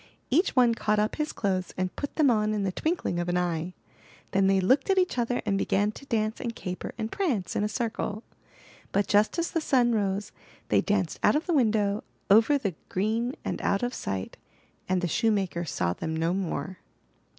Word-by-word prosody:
Each 330 +6 +2
one 245 -3 +5
caught 210 -2 0
up 210 +1 0
his 305 0 -1
clothes 185 -4 -2
and 185 -1 -2
put 285 - -5
them 295 -5 +4
on 215 -1 +1
in 205 - -1
the 190 - 0
twinkling 315 - -1
of 175 0 -2
an 175 - +1
eye. 175 0 -2 0.6
Then 195 0 +3
they 195 0 +4
looked 260 - +2
at 385 - +3
each 365 -8 +2
other 240 +1 0
and 200 -2 +1
began 205 +2 +1
to 275 +5 -13
dance 220 -2 -1
and 235 -3 -4
caper 180 0 -5
and 220 -1 -3
prance 275 - -1
in - - +1
a 210 - 0
circle! 220 -1 -3 0.7
But 200 +1 +2
just 210 +7 +3
as 335 0 -1
the 330 - 0
sun 250 -5 +3
rose, 200 -1 -1 0.4
they - - +4
danced 200 -5 0
out - - +4
of 305 - 0
the 350 - 0
window, 215 -6 +2 0.3
over 225 +8 +6
the 200 -9 -2 0.2
green 225 +6 0
and - - -3
out 200 +3 +1
of 245 +1 -1
sight; 95 -1 -4 0.5
and 185 -1 +2
the 180 - 0
shoemaker 195 -4 0
saw 90 - -1
them 160 - -4
no 165 +2 0
more. 190 0 -3
210 Hz, 205 wpm, -27 LUFS, 185-245 Hz, 0.7 s, over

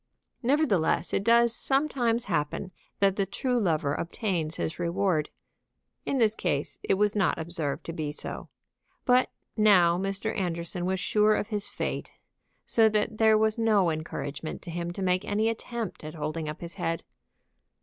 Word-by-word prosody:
Nevertheless 240 - +2
it 195 - +1
does 235 +1 +4
sometimes 255 -4 +1
happen 170 +1 -2 0.3
that 195 -1 +3
the 195 -1 +1
true 245 +5 0
lover 155 -8 +1
obtains 170 -2 -2
his 160 - -3
reward. 175 -2 0 0.8
In 275 - +1
this 220 -4 +4
case 150 -9 -2
it - - +1
was 210 +1 +1
not 195 -4 +2
observed 160 -3 -3
to 165 - -5
be 155 -3 -3
so. 150 - -7 0.6
But 250 0 +4 0.3
now 180 -5 +5
Mr. 195 +3 -2
Anderson 175 -1 -2
was 190 0 0
sure 210 +2 +3
of 210 - -2
his 210 -2 -3
fate, - - -4 0.5
so 225 -1 +4
that 215 0 -1
there 220 -1 +6
was 220 +1 +1
no 210 -6 +3
encouragement 155 -1 -5
to 175 - -7
him 170 +1 -3
to 190 +2 -5
make 180 0 +1
any 215 +2 +1
attempt 230 -4 -5
at 155 +2 -7
holding 155 0 -3
up 150 - -7
his 170 -1 -6
head. 165 0 -1
195 Hz, 160 wpm, -28 LUFS, 170-220 Hz, 0.8 s, there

